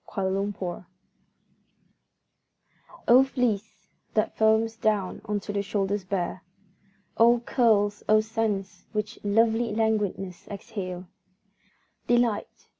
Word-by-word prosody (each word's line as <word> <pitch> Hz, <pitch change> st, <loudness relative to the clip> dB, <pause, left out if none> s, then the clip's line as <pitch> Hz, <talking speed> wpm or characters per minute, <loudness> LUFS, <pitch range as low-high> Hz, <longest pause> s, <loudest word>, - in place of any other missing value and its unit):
La 195 Hz, -, +1 dB
Chevelure 190 Hz, -2 st, -2 dB, 2.2 s
O 250 Hz, +3 st, +8 dB
fleece, 220 Hz, -6 st, -2 dB, 0.3 s
that 215 Hz, 0 st, +1 dB
foams 220 Hz, +1 st, +3 dB
down 210 Hz, -4 st, 0 dB
unto 205 Hz, -1 st, -3 dB
the 200 Hz, -, 0 dB
shoulders 200 Hz, 0 st, -1 dB
bare! 185 Hz, -1 st, -2 dB, 0.8 s
O 235 Hz, +1 st, +6 dB
curls, 210 Hz, -5 st, +2 dB
O 215 Hz, 0 st, +6 dB
scents 215 Hz, -3 st, -2 dB
which 215 Hz, +1 st, -3 dB
lovely 225 Hz, +2 st, +2 dB
languidness 210 Hz, -5 st, -1 dB
exhale! 190 Hz, -4 st, -6 dB, 1.0 s
Delight! 240 Hz, -3 st, 0 dB
210 Hz, 95 wpm, -26 LUFS, 195-225 Hz, 2.2 s, O